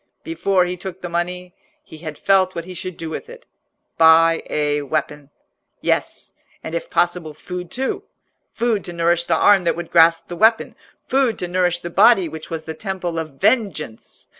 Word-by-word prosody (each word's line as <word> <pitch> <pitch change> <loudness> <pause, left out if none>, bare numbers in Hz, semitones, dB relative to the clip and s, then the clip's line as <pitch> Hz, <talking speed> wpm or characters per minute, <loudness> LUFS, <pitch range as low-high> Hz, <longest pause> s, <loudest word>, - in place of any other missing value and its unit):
Before 195 - +1
he 180 +1 -4
took 190 0 -8
the 175 - -4
money, 180 +1 -3 0.3
he 160 - -13
had 155 -2 -7
felt 190 +2 +2
what 170 -1 -5
he 185 - -8
should 185 -1 -6
do 165 -1 -6
with 465 - -6
it—buy 165 - +1
a 150 -1 0
weapon. 145 0 -3 0.5
Yes, - - -2 0.3
and 160 - -6
if 170 - -4
possible, 175 -3 0
food 180 +2 -7
too; 265 +2 -3 0.5
food 230 -4 0
to 175 - -6
nourish 170 0 +1
the 170 - +1
arm 200 0 +5
that - - +1
would 170 0 -7
grasp 165 0 +4
the 175 - -6
weapon, 225 +4 +3 0.3
food 265 -4 +1
to 180 - -4
nourish 175 -1 0
the 175 - -6
body 195 -1 +5
which 160 0 -9
was 160 -1 -5
the 160 - -5
temple 180 -3 -4
of 155 -3 -6
vengeance. 195 - -1
175 Hz, 180 wpm, -20 LUFS, 165-190 Hz, 0.5 s, arm